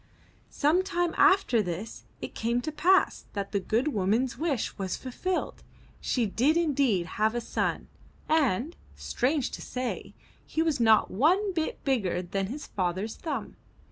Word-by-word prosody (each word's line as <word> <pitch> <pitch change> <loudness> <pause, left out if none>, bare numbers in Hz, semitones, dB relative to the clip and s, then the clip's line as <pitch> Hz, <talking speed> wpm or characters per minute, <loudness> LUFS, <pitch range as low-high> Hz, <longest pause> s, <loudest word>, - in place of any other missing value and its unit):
'' - - -33
Some 310 +5 +2
time 350 -2 -1
after 380 - +4
this 185 +3 -5 0.2
it - - -6
came 235 +2 0
to 310 - -4
pass 370 +6 +3
that 200 -1 -4
the 200 - +1
good 230 +9 0
woman's 225 +2 +1
wish 300 -7 -1
was 190 -2 -3
fulfilled. 355 +9 -3 0.4
She 245 -3 0
did 260 - +2
indeed 275 - +2
have 215 +5 0
a - - +1
son, 235 - -2 0.4
and, 300 - +1 0.2
strange 265 +2 -1
to - - -7
say, 250 -1 -4 0.3
he 320 - -1
was 315 -5 0
not 220 -2 +4
one 365 - +2
bit 320 -2 -2
bigger 195 -10 0
than 195 +2 -2
his 275 +8 -6
father's 190 +3 -2
thumb. 310 -4 -5
250 Hz, 155 wpm, -28 LUFS, 210-315 Hz, 0.4 s, after